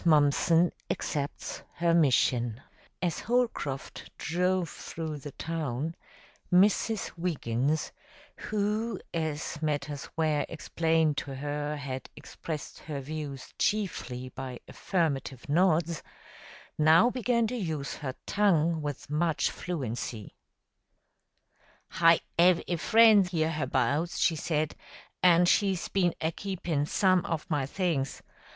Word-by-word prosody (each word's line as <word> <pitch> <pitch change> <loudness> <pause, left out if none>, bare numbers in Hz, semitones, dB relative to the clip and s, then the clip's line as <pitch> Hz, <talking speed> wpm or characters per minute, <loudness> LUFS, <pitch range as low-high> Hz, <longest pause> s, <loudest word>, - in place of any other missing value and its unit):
Mumpson 160 +2 +4 0.2
Accepts 145 -1 -3
Her 170 0 +2
Mission 125 -5 +2 0.4
As 170 -3 0
Holcroft 230 - -2
drove 180 +2 0
through 155 -1 -6
the 145 - -7
town, 155 -2 -3 0.6
Mrs. 205 +3 +3
Wiggins, 150 -3 -1 0.4
who, 215 +1 -1
as 155 -2 -3
matters 145 -2 -2
were 155 -2 +2
explained 160 -2 +1
to 135 - -4
her, 145 +2 -3
had 130 -2 -5
expressed 155 -4 -7
her 150 -3 -5
views 140 -1 -6
chiefly 135 -11 -1
by 130 -1 -7
affirmative 140 -8 -2
nods, 165 +1 +2 0.8
now 160 +10 +6
began 240 -2 +1
to 235 +3 -2
use 160 - -3
her 130 -3 -5
tongue 170 -5 +2
with 145 -2 -5
much 160 +2 +1
fluency. 120 - -5 1.6
"Hi 165 0 +5 0.2
'ave 175 0 +5
a 175 - 0
friend 215 0 +6
'herhabouts," 155 -2 0
she 165 - +3
said, 155 -1 -1 0.5
"an' 180 -1 +6
she's 190 0 +2
been 180 -3 +1
a 160 - 0
keepin' 170 -6 -2
some 185 0 +3
of 165 -4 -3
my 145 -3 +1
things. 155 -5 -1
160 Hz, 110 wpm, -29 LUFS, 145-180 Hz, 1.6 s, now